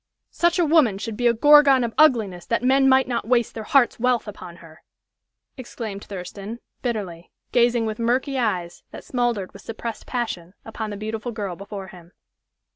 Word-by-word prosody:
Such 345 +1 +1
a 350 - +3
woman 295 -11 +4
should 220 +2 -5
be 245 +2 +1
a 235 - +4
gorgon 285 0 +6
of 230 -1 -3
ugliness 225 - +3
that 230 - 0
men 270 +1 +4
might 265 0 +4
not 235 -3 -3
waste 235 -2 +1
their 225 - -6
hearts' 265 -2 +3
wealth 250 -1 +1
upon 180 -4 -9
her!" 165 -2 -16 0.8
exclaimed 225 -5 -7
Thurston, 200 +3 -7 0.2
bitterly, 195 -9 -4 0.2
gazing 240 -1 +3
with 215 0 -4
murky 255 +3 0
eyes, 180 -7 -2
that - - -10
smoldered 240 -6 -2
with 200 - -12
suppressed 225 +1 -7
passion, 205 -8 -4
upon 220 -1 -5
the 205 - -6
beautiful 220 +3 -4
girl 205 -5 -4
before 200 0 -8
him. 175 -1 -15
225 Hz, 175 wpm, -23 LUFS, 200-250 Hz, 0.8 s, gorgon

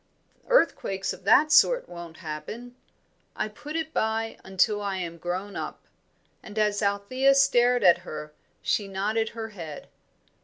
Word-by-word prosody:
Earthquakes 195 - +1
of 185 - -13
that 305 +9 +5
sort - - +5
won't 170 -2 -9
happen. 225 +11 -7 0.6
I - - -1
put 295 +8 -9
it 320 -1 -3
by 225 +1 -1
until 200 +2 +1
I 200 -2 -2
am 170 -2 -5
grown 185 +4 -4
up;" - - -6 0.6
and 215 0 -11
as 210 -1 +1
Althea 210 +7 +2
stared 245 -3 +4
at 175 -2 +6
her 155 -3 -8 0.3
she 205 - 0
nodded 210 +3 -1
her 225 -1 -6
head. 165 -8 -9
205 Hz, 145 wpm, -26 LUFS, 185-240 Hz, 0.6 s, at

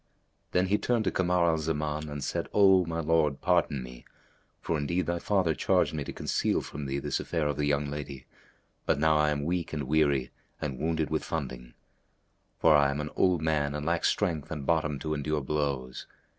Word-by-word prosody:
Then 90 +1 +2
he 100 +2 +1
turned 120 -2 +1
to - - 0
Kamar 90 -1 +2
al 80 -2 +2
Zaman 75 -1 -2
and 75 -1 -5
said, - - -3
"O 95 -3 +6
my 85 0 -2
lord, 75 -3 +2
pardon 85 -7 +1
me; 60 -1 -11 0.6
for 85 - -2
indeed 85 +4 -1
thy 85 +1 -1
father 95 -4 +1
charged - - +1
me 75 -2 -2
to - - -6
conceal - - 0
from 70 -1 -6
thee 70 +1 -2
this - - -2
affair 80 -3 -2
of 75 - -1
the 75 +1 -1
young 75 0 +1
lady; 70 -2 -6 0.6
but - - +3
now 80 +1 +3
I 75 0 +3
am 75 -1 -1
weak 85 +1 -2
and 75 -2 -2
weary 70 -2 +1 0.3
and 70 -4 -4
wounded 80 -1 -1
with 80 - 0
funding; 65 -6 -5 0.8
for 80 -2 +5
I 70 -1 +5
am 70 +1 -2
an 75 0 -4
old 90 -4 +2
man 75 -2 0
and 75 0 -4
lack 85 +1 0
strength 85 -8 0
and 75 -3 -5
bottom 75 -3 +1
to 75 +2 -3
endure 75 0 -1
blows. 70 -3 -3
75 Hz, 200 wpm, -28 LUFS, 70-85 Hz, 0.8 s, O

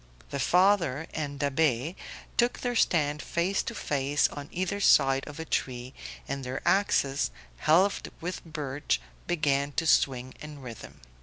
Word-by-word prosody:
The 140 - -3
father 175 -4 +3
and 145 -2 -4
Da'Be 145 +1 +1 0.4
took 240 +1 +1
their 245 -1 -1
stand 150 -8 +2
face 180 +3 0
to 230 - -5
face 145 -4 +1
on 145 -1 -8
either 185 +3 -2
side 135 -7 +5
of 150 +1 -9
a 160 - -4
tree, 125 -3 -2 0.3
and 140 0 -3
their 130 +1 -4
axes, 145 -8 +2 0.3
helved 180 - +3
with 180 +2 -5
birch, 145 - -2 0.3
began 145 -4 +1
to 165 - -1
swing 130 -4 +2
in 150 -1 -8
rhythm. 120 - -10
145 Hz, 145 wpm, -28 LUFS, 135-170 Hz, 0.4 s, side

